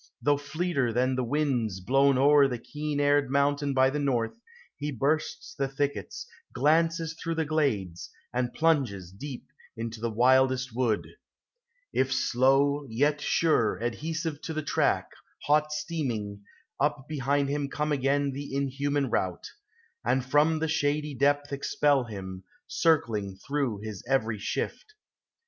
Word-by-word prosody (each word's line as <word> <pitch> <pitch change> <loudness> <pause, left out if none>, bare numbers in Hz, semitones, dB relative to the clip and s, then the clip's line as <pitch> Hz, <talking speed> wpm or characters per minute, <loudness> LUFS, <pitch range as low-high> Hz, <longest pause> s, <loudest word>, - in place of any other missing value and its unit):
though 145 0 +3
fleeter 145 -3 -1
than 125 +3 +1
the 130 - 0
winds 125 -7 0
Blown 135 +7 +3
o'er 140 +1 +6
the 125 -2 -3
keen 150 +4 -4
aired 145 -1 +3
mountain 140 +1 +1
by 130 -1 +4
the 140 +2 -1
north, 125 -5 0 0.4
He 145 +1 -4
bursts 155 +5 -1
the 135 - -1
thickets, 145 - -3 0.3
glances 165 +4 +2
through 165 0 -4
the 160 -1 0
glades, 115 - -1 0.2
And 125 0 0
plunges 130 - +1
deep 130 +6 -8 0.3
into 115 -1 -5
the 115 - 0
wildest 130 +2 +3
wood,— 120 -4 0 0.9
If 130 0 +1
slow, 135 +3 +2
yet 145 +6 +1
sure, 155 -11 +2
adhesive 155 +6 -3
to 160 - -5
the 155 - -2
track - - +1 0.4
Hot 150 +1 +2
steaming, 120 -11 -3 0.3
up 145 -2 0
behind 140 -1 0
him 145 -1 -1
come 150 +2 -2
again 140 0 +1
The 140 0 -6
inhuman 140 +1 0
rout, 90 -2 -2 0.5
and 130 -1 +1
from 150 +4 +3
the 160 +1 -1
shady 150 -1 0
depth 145 +1 +1
Expel 140 -1 +1
him, 95 -4 -7 0.2
circling 115 - +1
through 135 -7 -2
his 105 -4 -6
every 110 -5 0
shift. 430 - -4
140 Hz, 140 wpm, -28 LUFS, 125-150 Hz, 0.9 s, o'er